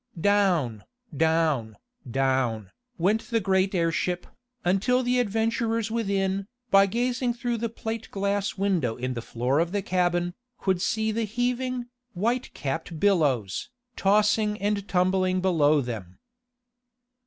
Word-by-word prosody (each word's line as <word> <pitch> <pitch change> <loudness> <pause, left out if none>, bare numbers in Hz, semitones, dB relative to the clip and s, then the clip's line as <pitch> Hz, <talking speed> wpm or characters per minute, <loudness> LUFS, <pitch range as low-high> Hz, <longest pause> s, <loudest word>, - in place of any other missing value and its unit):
Down, 175 - +2 0.3
down, 155 -8 +1 0.3
down, 125 -5 0 0.3
went 200 +6 +1
the 230 - +2
great 190 -1 +1
airship, 175 +1 0 0.4
until 225 +8 +2
the 250 0 +2
adventurers 225 0 0
within, 195 -3 0 0.2
by 195 0 +6
gazing 240 +3 0
through 240 0 -2
the 230 +1 -2
plate 225 0 -5
glass 200 0 -1
window 180 - +1
in 130 +1 -3
the 120 - -4
floor 125 +5 0
of 170 +1 0
the 200 0 -1
cabin, 175 -1 +1 0.2
could 190 -2 0
see 220 +2 0
the 225 +1 -1
heaving, 245 +2 -1 0.3
white 235 +7 -1
capped 160 +3 -4
billows, 145 - +1 0.3
tossing 210 +1 +2
and 205 0 -1
tumbling 185 0 +2
below 155 -5 +3
them. 105 -8 -6
195 Hz, 125 wpm, -26 LUFS, 160-220 Hz, 0.4 s, by